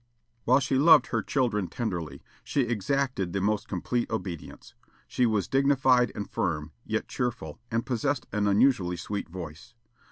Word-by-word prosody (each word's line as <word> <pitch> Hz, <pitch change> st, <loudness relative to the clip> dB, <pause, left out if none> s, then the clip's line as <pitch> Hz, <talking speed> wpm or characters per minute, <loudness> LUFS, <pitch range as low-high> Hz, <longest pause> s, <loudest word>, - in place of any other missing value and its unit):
While 130 Hz, +3 st, +5 dB
she 135 Hz, -1 st, 0 dB
loved 155 Hz, -2 st, +7 dB
her -, -, +1 dB
children 115 Hz, -8 st, 0 dB
tenderly, 90 Hz, -, -4 dB, 0.2 s
she 140 Hz, -, 0 dB
exacted 120 Hz, -3 st, -1 dB
the 100 Hz, -, 0 dB
most 105 Hz, +2 st, 0 dB
complete 120 Hz, +6 st, -2 dB
obedience. 95 Hz, -7 st, -6 dB, 0.3 s
She 125 Hz, -, +1 dB
was 105 Hz, -5 st, 0 dB
dignified 135 Hz, -3 st, +3 dB
and 100 Hz, -, -4 dB
firm, 75 Hz, -3 st, -2 dB
yet 110 Hz, -, -2 dB
cheerful, 125 Hz, -1 st, -4 dB
and 115 Hz, 0 st, -1 dB
possessed 130 Hz, +2 st, -1 dB
an 105 Hz, -1 st, 0 dB
unusually 100 Hz, -4 st, +3 dB
sweet 100 Hz, +3 st, -4 dB
voice. 90 Hz, +7 st, -9 dB
115 Hz, 150 wpm, -27 LUFS, 95-130 Hz, 0.3 s, loved